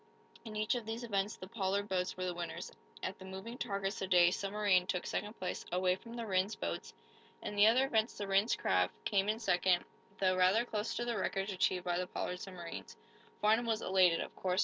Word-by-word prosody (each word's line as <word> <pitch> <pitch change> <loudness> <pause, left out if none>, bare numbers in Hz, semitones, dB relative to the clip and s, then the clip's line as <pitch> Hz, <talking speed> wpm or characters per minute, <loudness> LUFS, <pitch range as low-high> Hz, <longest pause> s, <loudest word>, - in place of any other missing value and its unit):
In 220 -2 -8
each 215 0 +1
of 240 -3 -3
these 225 +2 -4
events 205 -2 -1
the - - -9
Pollard 200 -1 -1
boats 180 -2 -1
were 185 - -2
the 180 - -1
winners. 170 -1 -5 0.3
At 185 - -3
the 190 - -10
moving 190 +5 -7
targets 200 -4 -2
the 190 - -2
Day 175 -1 +6
Submarine 195 -2 +2
took 185 -1 -1
second 210 +1 -3
place 185 - -3
away 180 +1 +2
from 230 +4 -11
the 235 -1 -4
Rhinds 190 +1 +1
boats; - - -4 0.5
in 210 - -4
the 205 +1 +7
other 250 +4 +5
events 225 -3 +1
the 205 - -3
Rhinds 195 +4 +3
craft 90 -1 +1
came 200 0 +2
in 215 - +1
second, 180 -5 +2 0.3
though 185 -1 +2
rather 185 +6 +4
close 215 -2 -2
to 240 - -1
the 235 -3 -1
records 195 +1 -1
achieved 185 -1 +1
by 175 0 0
the 180 - -2
Pollard 180 0 -3
submarines. 180 -3 -8 0.4
Farnum 220 +3 +3
was 225 -1 0
elated, 185 -3 +4
of - - -6
course. 185 0 0
195 Hz, 215 wpm, -34 LUFS, 185-215 Hz, 0.5 s, the